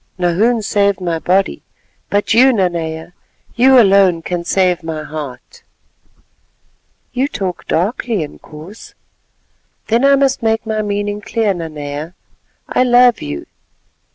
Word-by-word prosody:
"Nahoon 210 Hz, +6 st, +1 dB
saved 200 Hz, -1 st, +1 dB
my 170 Hz, -3 st, -2 dB
body, 190 Hz, +4 st, 0 dB, 0.5 s
but 205 Hz, +1 st, +1 dB
you, 255 Hz, +4 st, +6 dB
Nanea, 170 Hz, -5 st, -2 dB, 0.4 s
you 260 Hz, +2 st, +6 dB
alone 195 Hz, -5 st, +4 dB
can 175 Hz, 0 st, -3 dB
save 180 Hz, 0 st, +1 dB
my 160 Hz, -2 st, -5 dB
heart." 145 Hz, -5 st, -8 dB, 1.5 s
"You 260 Hz, +2 st, 0 dB
talk 190 Hz, -, -5 dB
darkly, 205 Hz, +2 st, -1 dB
Inkoos." 155 Hz, +6 st, -12 dB, 0.9 s
"Then 230 Hz, +3 st, +2 dB
I 275 Hz, 0 st, +6 dB
must 275 Hz, -1 st, +1 dB
make 225 Hz, 0 st, 0 dB
my 220 Hz, -1 st, -1 dB
meaning 205 Hz, 0 st, -3 dB
clear, 215 Hz, -1 st, 0 dB
Nanea. 155 Hz, -1 st, -6 dB, 0.5 s
I -, -, 0 dB
love 245 Hz, -1 st, +4 dB
you." 75 Hz, -1 st, -5 dB
195 Hz, 120 wpm, -16 LUFS, 165-225 Hz, 1.5 s, you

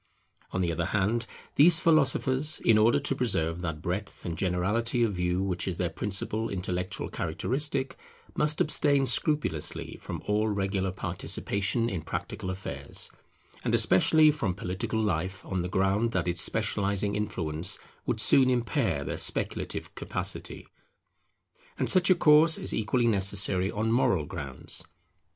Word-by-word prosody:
On 95 Hz, -, -2 dB
the 85 Hz, -2 st, 0 dB
other 85 Hz, 0 st, -2 dB
hand 110 Hz, +4 st, 0 dB, 0.3 s
these 160 Hz, +3 st, +8 dB
philosophers, 145 Hz, -2 st, +2 dB
in 110 Hz, -2 st, +5 dB
order 115 Hz, +5 st, +4 dB
to 140 Hz, -1 st, -1 dB
preserve 85 Hz, -10 st, 0 dB
that 80 Hz, -2 st, -5 dB
breadth 95 Hz, +3 st, -5 dB
and 85 Hz, -2 st, -3 dB
generality 105 Hz, +7 st, 0 dB
of 110 Hz, -3 st, 0 dB
view 90 Hz, +1 st, -1 dB
which 90 Hz, -2 st, -2 dB
is 90 Hz, -3 st, -3 dB
their 90 Hz, 0 st, -2 dB
principal 105 Hz, +2 st, -1 dB
intellectual 90 Hz, -1 st, -3 dB
characteristic, 135 Hz, 0 st, -2 dB, 0.4 s
must 150 Hz, 0 st, +1 dB
abstain 145 Hz, -2 st, +3 dB
scrupulously 145 Hz, -, -1 dB
from -, -, -7 dB
all 105 Hz, +1 st, +1 dB
regular 95 Hz, -2 st, -1 dB
participation 100 Hz, +4 st, -2 dB
in 95 Hz, -7 st, -3 dB
practical 95 Hz, -, -5 dB
affairs, 95 Hz, 0 st, -3 dB, 0.5 s
and -, -, +1 dB
especially 155 Hz, -1 st, +5 dB
from 110 Hz, -, -2 dB
political 100 Hz, +4 st, -3 dB
life: 95 Hz, -2 st, -2 dB
on 95 Hz, -2 st, -2 dB
the 90 Hz, -, -4 dB
ground 95 Hz, +5 st, 0 dB
that 90 Hz, -1 st, -1 dB
its 85 Hz, 0 st, 0 dB
specializing 100 Hz, -2 st, 0 dB
influence 90 Hz, -5 st, -1 dB, 0.3 s
would -, -, -1 dB
soon 130 Hz, -1 st, +5 dB
impair 120 Hz, -, 0 dB
their -, -, -4 dB
speculative -, -, -2 dB
capacity. -, -, -5 dB, 1.1 s
And -, -, -1 dB
such 180 Hz, -1 st, +3 dB
a 185 Hz, -, +6 dB
course 160 Hz, -1 st, +5 dB
is -, -, -2 dB
equally 115 Hz, +3 st, 0 dB
necessary 95 Hz, -3 st, +2 dB
on 110 Hz, +2 st, -2 dB
moral 95 Hz, -, +2 dB
grounds. 70 Hz, -6 st, -5 dB
100 Hz, 140 wpm, -27 LUFS, 90-125 Hz, 1.1 s, these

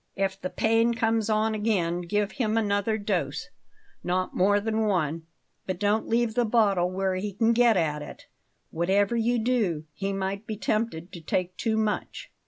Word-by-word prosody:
If 195 Hz, 0 st, -2 dB
the 185 Hz, -, -3 dB
pain 225 Hz, +3 st, +2 dB
comes 225 Hz, -1 st, +1 dB
on 220 Hz, +1 st, +2 dB
again, 190 Hz, -6 st, 0 dB
give 205 Hz, +3 st, -1 dB
him 225 Hz, -4 st, -1 dB
another 205 Hz, 0 st, +1 dB
dose 190 Hz, -, -2 dB, 0.5 s
not 185 Hz, +1 st, -1 dB
more 205 Hz, +3 st, +3 dB
than 220 Hz, +1 st, 0 dB
one; 165 Hz, -4 st, -1 dB, 0.4 s
but 185 Hz, -, -2 dB
don't 205 Hz, +3 st, +1 dB
leave 230 Hz, -1 st, +1 dB
the 245 Hz, +1 st, +2 dB
bottle 205 Hz, -6 st, +2 dB
where 190 Hz, +1 st, -1 dB
he 195 Hz, +2 st, -3 dB
can 225 Hz, +3 st, +2 dB
get 235 Hz, -2 st, +4 dB
at 150 Hz, -3 st, 0 dB
it, -, -, -10 dB, 0.5 s
whatever 195 Hz, +6 st, +1 dB
you 235 Hz, +1 st, +1 dB
do; 220 Hz, -10 st, 0 dB
he 195 Hz, +6 st, -3 dB
might 195 Hz, +2 st, -3 dB
be 215 Hz, -, -4 dB
tempted 210 Hz, -6 st, -2 dB
to 170 Hz, -, -9 dB
take 180 Hz, +3 st, -2 dB
too 220 Hz, +2 st, -1 dB
much." 215 Hz, -1 st, -2 dB
205 Hz, 175 wpm, -26 LUFS, 185-225 Hz, 0.5 s, get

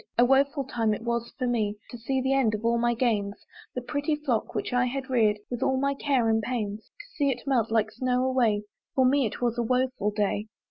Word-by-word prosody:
A 240 Hz, -, +6 dB
woeful 275 Hz, +2 st, +3 dB
time 225 Hz, -4 st, 0 dB
it 215 Hz, -, -9 dB
was 235 Hz, 0 st, -2 dB
for 255 Hz, -, -1 dB
me, 215 Hz, -4 st, 0 dB
To 240 Hz, -, -7 dB
see 260 Hz, +3 st, -1 dB
the 265 Hz, +1 st, +1 dB
end 245 Hz, -6 st, +2 dB
of 215 Hz, +2 st, -6 dB
all 235 Hz, 0 st, +2 dB
my 240 Hz, 0 st, +2 dB
gains, 210 Hz, -4 st, 0 dB, 0.4 s
The 250 Hz, -, -3 dB
pretty 290 Hz, +3 st, -1 dB
flock 270 Hz, -7 st, -2 dB
which -, -, -2 dB
I 250 Hz, 0 st, +3 dB
had 265 Hz, +1 st, -4 dB
reared 215 Hz, -4 st, +3 dB
With 245 Hz, 0 st, -3 dB
all 265 Hz, -, +2 dB
my 280 Hz, +1 st, +1 dB
care 270 Hz, -4 st, +1 dB
and 225 Hz, 0 st, +2 dB
pains, 215 Hz, -2 st, -3 dB
To 415 Hz, -, -15 dB
see 285 Hz, -2 st, +2 dB
it 245 Hz, -2 st, -3 dB
melt 260 Hz, -5 st, +1 dB
like 220 Hz, -1 st, +1 dB
snow 250 Hz, +2 st, 0 dB
away! 235 Hz, -5 st, +2 dB, 0.3 s
For 260 Hz, -, +4 dB
me 270 Hz, -1 st, +3 dB
it 210 Hz, -, -8 dB
was 240 Hz, 0 st, 0 dB
a -, -, +2 dB
woeful 250 Hz, -3 st, 0 dB
day. 210 Hz, 0 st, -1 dB
245 Hz, 235 wpm, -27 LUFS, 225-265 Hz, 0.4 s, A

